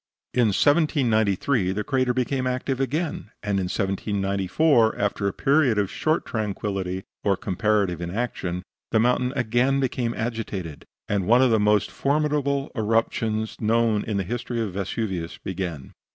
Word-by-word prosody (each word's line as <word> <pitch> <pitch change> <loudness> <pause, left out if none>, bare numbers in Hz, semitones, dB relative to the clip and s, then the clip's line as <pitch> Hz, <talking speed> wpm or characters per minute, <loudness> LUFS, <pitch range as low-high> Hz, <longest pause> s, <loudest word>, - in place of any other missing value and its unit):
In 120 -2 +3
1793 115 - +2
the 105 +2 -2
crater 130 -1 +1
became 130 +1 -1
active 130 +1 -2
again, 145 -2 -2
and 100 -1 0
in 95 - -1
1794 100 - +1
after 100 0 0
a - - +1
period 135 -4 +2
of 100 -2 0
short 155 +1 0
tranquillity 100 -4 -3 0.2
or 100 -2 +2
comparative 100 -4 0
inaction, 90 -2 -3 0.3
the 110 - +2
mountain 125 +2 +2
again 125 +2 +2
became 125 -3 -1
agitated, 110 -9 -4 0.2
and 100 -3 -1
one 120 +4 +6
of 130 - +4
the 110 - +4
most 105 -1 +2
formidable 140 +2 0
eruptions 110 -1 0
known 115 -1 +2
in 105 -2 -2
the 100 - 0
history 120 +4 -3
of 110 -5 -2
Vesuvius 95 -3 -3
began. 85 -7 -5
110 Hz, 140 wpm, -24 LUFS, 100-125 Hz, 0.3 s, one